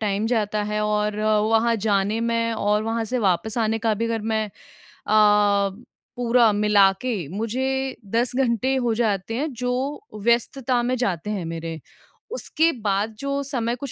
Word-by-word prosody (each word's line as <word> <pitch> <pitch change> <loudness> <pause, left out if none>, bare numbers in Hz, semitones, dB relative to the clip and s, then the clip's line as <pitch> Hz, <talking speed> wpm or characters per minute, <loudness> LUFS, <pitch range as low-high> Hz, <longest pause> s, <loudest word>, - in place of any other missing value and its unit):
Time 210 0 0
जाता 215 -3 0
है 210 0 -1
और 210 0 0
वहाँ 220 +2 +2
जाने 205 +2 +1
में 230 0 0
और 210 0 +1
वहाँ 225 0 -1
से 250 +3 -2
वापस 200 +2 0
आने 225 0 +1
का 225 -1 +1
भी 230 +3 -2
अगर 230 -1 -1
मैं 220 0 -1 0.4
अ, 205 -1 +3 0.5
पूरा 240 -2 +4
मिला 205 -2 +4
के 215 - -2
मुझे 265 +4 -1 0.2
10 240 +2 0
घंटे 260 0 +1
हो 245 -3 +1
जाते 220 -1 -1
हैं 300 +2 -2
जो 250 - -2 0.2
व्यस्तता 240 +1 +1
में 250 +1 0
जाते 200 -5 -2
हैं 195 -5 -3
मेरे। 165 -1 -5 0.6
उसके 325 -7 +1
बाद 205 +2 0
जो 280 0 -2
समय 240 -4 -2
कुछ 265 +1 -7
225 Hz, 160 wpm, -23 LUFS, 210-245 Hz, 0.6 s, पूरा